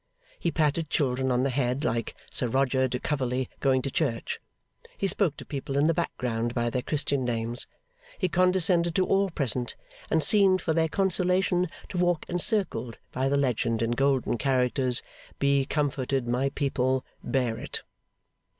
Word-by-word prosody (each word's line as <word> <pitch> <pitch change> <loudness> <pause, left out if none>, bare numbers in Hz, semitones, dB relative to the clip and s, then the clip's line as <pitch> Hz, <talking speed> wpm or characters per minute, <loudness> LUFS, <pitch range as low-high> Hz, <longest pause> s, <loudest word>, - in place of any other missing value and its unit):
He 170 - 0
patted 155 0 0
children 130 -2 +1
on 125 0 +2
the 135 - +1
head 125 +1 0
like 115 -6 -1 0.2
Sir 125 - -1
Roger 130 +1 +2
de 125 - -2
Coverley 130 -2 -1
going 130 -2 +2
to 135 - -2
church, 130 -9 -1 0.6
he - - -1
spoke 190 -4 +2
to - - -9
people 140 -1 -4
in 145 - +4
the 165 - +4
background 120 -8 -2
by 120 -1 0
their 125 - -1
Christian 140 -1 0
names, 120 0 -2 0.5
he 185 - +1
condescended 180 -1 +2
to 185 - +3
all 195 +1 +2
present, 125 - -1 0.3
and 160 -1 +2
seemed 195 -3 +5
for 165 -2 -1
their 160 0 +2
consolation 185 0 +1 0.2
to 180 - -3
walk 175 -2 +1
encircled 175 - 0
by 130 +1 0
the 140 - +2
legend 115 -4 +1
in 115 - 0
golden 135 -2 +1
characters, 130 -1 +2 0.3
'Be 140 -1 +2
comforted, 135 -3 -1
my 125 +3 +1
people! 130 -2 0 0.2
Bear 125 -4 0
it! - - -4
135 Hz, 160 wpm, -27 LUFS, 125-165 Hz, 0.6 s, seemed